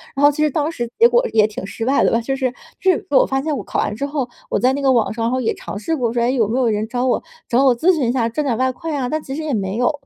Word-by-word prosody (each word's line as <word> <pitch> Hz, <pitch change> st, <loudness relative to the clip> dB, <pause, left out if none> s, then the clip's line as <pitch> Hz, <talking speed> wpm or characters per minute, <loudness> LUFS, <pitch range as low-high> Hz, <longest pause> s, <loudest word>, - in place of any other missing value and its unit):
然 280 Hz, -, -1 dB
后 290 Hz, -, +7 dB
其 305 Hz, +1 st, -1 dB
实 305 Hz, -, +3 dB
当 300 Hz, +3 st, -1 dB
时 240 Hz, -7 st, -4 dB
结 470 Hz, -, +8 dB
果 -, -, +2 dB
也 215 Hz, -2 st, +5 dB
挺 210 Hz, -2 st, -7 dB
失 225 Hz, +3 st, -5 dB
败 270 Hz, +2 st, +3 dB
的 -, -, +3 dB
吧， 230 Hz, -, +2 dB
就 270 Hz, +3 st, -2 dB
是 260 Hz, -2 st, -1 dB, 0.3 s
就 380 Hz, -, +4 dB
是 350 Hz, -, -2 dB
我 275 Hz, -, +5 dB
发 270 Hz, 0 st, 0 dB
现 305 Hz, +1 st, -2 dB
我 -, -, -5 dB
考 -, -, -4 dB
完 210 Hz, -, -1 dB
之 280 Hz, -, -3 dB
后， 280 Hz, -4 st, -2 dB, 0.2 s
我 -, -, +1 dB
在 255 Hz, +1 st, +3 dB
那 280 Hz, -, -2 dB
个 270 Hz, -, +3 dB
网 235 Hz, -4 st, +2 dB
上， 225 Hz, 0 st, -3 dB
然 235 Hz, -, 0 dB
后 255 Hz, -, 0 dB
也 225 Hz, -, 0 dB
尝 -, -, -7 dB
试 320 Hz, +11 st, -2 dB
过 240 Hz, -5 st, -1 dB
说：” 240 Hz, -, 0 dB
诶， 250 Hz, +2 st, +1 dB
有 225 Hz, -6 st, +2 dB
没 240 Hz, +4 st, -1 dB
有 250 Hz, -, +2 dB
人 215 Hz, +1 st, -1 dB
找 245 Hz, +2 st, -2 dB
我 -, -, +1 dB, 0.3 s
找 245 Hz, +3 st, +2 dB
我 260 Hz, -3 st, +4 dB
咨 350 Hz, +10 st, +3 dB
询 255 Hz, -6 st, 0 dB
一 -, -, +3 dB
下， 245 Hz, -3 st, +1 dB
挣 300 Hz, +6 st, -2 dB
点 235 Hz, -4 st, 0 dB
外 260 Hz, 0 st, +1 dB
快 310 Hz, +4 st, -5 dB
啊。 255 Hz, -3 st, -1 dB
“但 310 Hz, 0 st, -2 dB
其 270 Hz, -1 st, -6 dB
实 315 Hz, -, -4 dB
也 300 Hz, -, -2 dB
没 195 Hz, -2 st, -2 dB
有， 245 Hz, +5 st, +2 dB
260 Hz, 375 characters per minute, -19 LUFS, 235-290 Hz, 0.3 s, 结